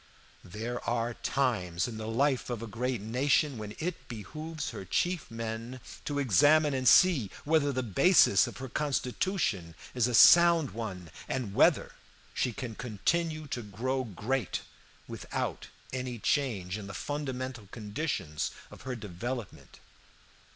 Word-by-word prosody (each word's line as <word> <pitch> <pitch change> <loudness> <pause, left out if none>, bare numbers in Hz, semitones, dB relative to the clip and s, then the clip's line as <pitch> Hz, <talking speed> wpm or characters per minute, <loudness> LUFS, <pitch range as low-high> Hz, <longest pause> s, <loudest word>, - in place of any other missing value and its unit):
There 110 +6 -5
are 120 0 0
times 100 -11 0
in 115 -2 -6
the 110 - -5
life 130 +4 +1
of 120 -2 -3
a - - -3
great 120 +1 -2
nation 130 +4 +1
when 105 0 -7
it 170 +1 -4
behooves 155 +7 -6
her 110 -4 -7
chief 175 - -1
men 115 +2 -5 0.3
to 145 - -2
examine 145 - +4
and 130 -1 0
see 150 - +6
whether 150 -2 +2
the 130 -1 -1
basis 115 - +5
of - - -8
her 130 - -6
constitution 125 - -1 0.2
is 125 -2 +2
a 125 - 0
sound 170 +1 +7
one, 95 -7 -6 0.2
and 120 -7 -2
whether - - +4 0.4
she 125 - 0
can 120 0 -6
continue 155 - -1
to 120 - -3
grow 125 +6 -2
great 115 +1 -2 0.5
without - - -4 0.3
any 125 -1 -3
change 105 -7 -1
in 100 - -8
the 105 - -7
fundamental 130 -6 -4
conditions 105 - -3 0.2
of - - -12
her 130 -2 -4
development. 115 +2 -6
125 Hz, 140 wpm, -30 LUFS, 105-140 Hz, 0.5 s, sound